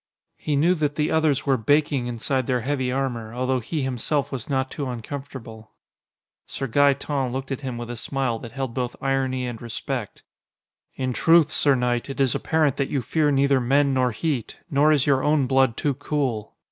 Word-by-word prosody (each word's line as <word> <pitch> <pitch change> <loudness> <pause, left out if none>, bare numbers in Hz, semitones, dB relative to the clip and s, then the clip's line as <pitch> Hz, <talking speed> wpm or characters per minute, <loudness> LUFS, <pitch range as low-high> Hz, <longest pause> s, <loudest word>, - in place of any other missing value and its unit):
He 150 - -1
knew 165 +6 +4
that 150 -4 -1
the 150 0 0
others 155 -4 +2
were 135 -2 +3
baking 140 +1 +1
inside 125 +2 -1
their 125 -2 +1
heavy 130 0 -1
armor, 120 -4 -3
although 130 +1 0
he 145 +5 -3
himself 130 +3 -1
was 130 -2 -5
not 130 -1 0
too 140 -3 -4
uncomfortable. 120 -2 -8 0.7
Sir 135 - -4
Gaeton 140 0 +2
looked 130 +2 -4
at 135 - -3
him 130 -3 -4
with 120 0 -6
a - - -5
smile 125 -1 -2
that 115 - -9
held 135 -3 -3
both 125 -1 -3
irony 130 -1 0
and 120 -2 -6
respect. 120 0 -5 0.7
"In 130 -1 -2
truth, 165 +5 +4
sir 145 -3 +3
knight, 125 0 -1
it 135 - -6
is 135 -3 +3
apparent 155 -4 +1
that 140 - -1
you 135 -4 -1
fear 150 +4 +1
neither 140 -1 +3
men 140 +3 +3
nor 130 -1 +2
heat. 125 0 -2
Nor 145 +2 +4
is 145 -4 +3
your 135 -2 +3
own 150 -1 +2
blood 130 -2 +2
too 145 - 0
cool. 135 -6 -2
135 Hz, 190 wpm, -24 LUFS, 125-145 Hz, 0.7 s, knew